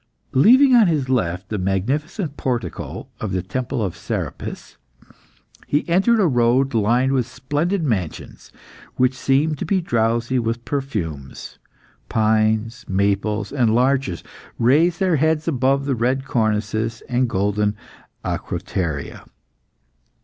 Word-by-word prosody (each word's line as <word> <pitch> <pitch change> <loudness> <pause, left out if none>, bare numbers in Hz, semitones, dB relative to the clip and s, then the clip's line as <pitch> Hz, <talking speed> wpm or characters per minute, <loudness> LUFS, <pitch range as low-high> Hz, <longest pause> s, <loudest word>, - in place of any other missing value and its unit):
Leaving 255 - +6
on 230 -5 +6
his 150 -6 0
left 95 -6 -1
the 105 - -2
magnificent 140 - -2
portico 125 -4 -4
of 110 - -3
the 90 -2 -1
Temple 120 +3 -3
of 95 -4 -3
Serapis, - - -5 0.9
he 145 - 0
entered 195 +7 +3
a 200 - +4
road 125 -1 +2
lined 120 +4 +2
with 130 -4 +1
splendid 150 +9 -2
mansions, 100 - -4 0.4
which 130 +1 +2
seemed 140 +3 +1
to - - -2
be 190 +3 +1
drowsy 120 -4 0
with 115 0 -3
perfumes. 90 - -5 0.5
Pines, 110 +1 +1
maples, 100 +2 0
and 120 -6 +2
larches 130 -7 +1 0.3
raised 155 +9 +3
their 185 -5 +2
heads 160 +2 +1
above 135 -1 +1
the 140 - 0
red 130 +3 0
cornices 110 -1 -1
and 125 0 +1
golden 105 +1 0 0.5
acroteria. 80 -7 -4
125 Hz, 120 wpm, -21 LUFS, 110-140 Hz, 0.9 s, Leaving